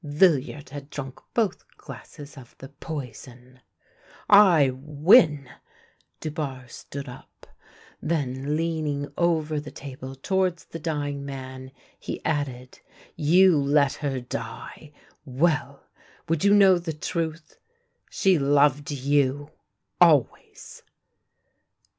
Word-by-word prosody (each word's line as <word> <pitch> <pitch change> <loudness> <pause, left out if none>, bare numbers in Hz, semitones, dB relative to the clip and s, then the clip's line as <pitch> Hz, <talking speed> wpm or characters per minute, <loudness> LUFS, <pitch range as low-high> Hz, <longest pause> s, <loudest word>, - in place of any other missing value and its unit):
Villiard 145 -3 +1
had 140 0 -9
drunk 135 -3 -7 0.2
both 210 -6 0
glasses 145 -2 -12
of 130 -4 -14
the 135 - -11
poison! 130 -4 -9 0.4
" - - -26 0.2
I 145 -6 +4
win! 150 - +4 0.4
" - - -37
Dubarre 145 -5 -5
stood 140 +3 -9
up. 125 - -13 0.6
Then, 145 -2 -2
leaning 155 -4 -2
over 160 -3 0
the 150 0 -8
table 135 -2 -9
towards 185 +4 -1
the 165 - -9
dying 145 -3 -3
man, 130 -1 -8 0.3
he - - -6
added: 130 -5 -3 0.3
" - - -30
You 175 +4 +5
let 140 0 +2
her 140 -3 -3
die 120 +5 -8 0.2
— - - -38
well! 140 0 -1 0.4
Would 165 -1 -1
you 200 0 +5
know 190 -3 +6
the 170 -2 -5
truth? 160 0 -5 0.5
She 190 -4 +2
loved 145 0 +2
you 145 +1 0 0.3
— - - -46
always 155 -7 +1
145 Hz, 115 wpm, -25 LUFS, 135-160 Hz, 0.6 s, know